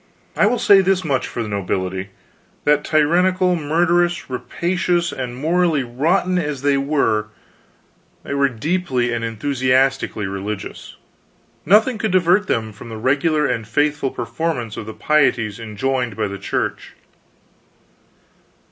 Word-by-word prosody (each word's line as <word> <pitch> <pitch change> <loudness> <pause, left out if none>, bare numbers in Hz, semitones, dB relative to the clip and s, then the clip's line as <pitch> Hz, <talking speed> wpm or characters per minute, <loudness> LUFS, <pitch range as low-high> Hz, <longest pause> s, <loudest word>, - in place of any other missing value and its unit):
I - - +4
will 245 - +1
say 200 -3 +6
this 190 0 +1
much 140 -5 -1
for 120 - -4
the - - -5
nobility: 95 -1 -3 0.5
that, 150 0 +3
tyrannical, 180 +4 +2
murderous, 175 +1 +1
rapacious, 175 +5 -1
and 125 -2 -5
morally 160 +1 +1
rotten 160 +9 +1
as 150 -5 -3
they 145 -1 +3
were, 135 -7 +1 1.0
they - - -5
were 140 0 +2
deeply 130 -1 -1
and 115 -1 -2
enthusiastically 130 0 0
religious. 100 +2 -6 0.7
Nothing 220 +5 +4
could 220 - 0
divert 185 +3 +3
them 110 - -1
from 115 +3 -11
the 110 - -6
regular 145 +6 +1
and 115 -5 -2
faithful 145 +3 0
performance 120 -1 -3
of 110 - -7
the 110 - -7
pieties 120 -8 +1
enjoined 120 +2 -2
by 105 -1 -1
the 100 0 -7
Church. - - -3
140 Hz, 130 wpm, -20 LUFS, 115-170 Hz, 1.0 s, say